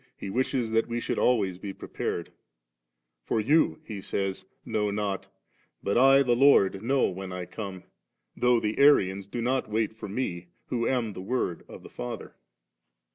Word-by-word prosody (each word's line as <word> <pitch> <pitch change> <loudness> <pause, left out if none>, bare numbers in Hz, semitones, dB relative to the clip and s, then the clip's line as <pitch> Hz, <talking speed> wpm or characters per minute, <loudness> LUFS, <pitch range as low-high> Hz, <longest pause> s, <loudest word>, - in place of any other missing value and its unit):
He 95 - -6
wishes 125 -1 0
that 115 0 +2
we 120 0 -2
should - - -2
always 100 -7 +2
be 100 0 -6
prepared; 85 - -4 0.9
*for 110 - 0
you,' 150 +9 +3
He 105 -3 -6
sa3rs, 95 0 -3 0.2
'know 105 -1 0
not; 100 -1 -2 0.6
but 100 - 0
I, 135 +2 +6
the 120 -2 +2
Lord, 120 -8 +5
know 130 +4 +2
when 95 0 -6
I 90 -1 -4
come, 95 -2 -7 0.5
though 125 -1 +3
the 105 -1 -2
Arians 100 -9 +4
do 115 +3 -4
not 130 -1 0
wait 110 0 0
for 110 -2 -8
Me, 90 -6 -3 0.2
who 115 -2 0
am 120 -5 0
the 90 - -7
Word 95 -4 -2
of - - -11
the - - -11
Father.' - - -6
110 Hz, 170 wpm, -27 LUFS, 95-125 Hz, 0.9 s, I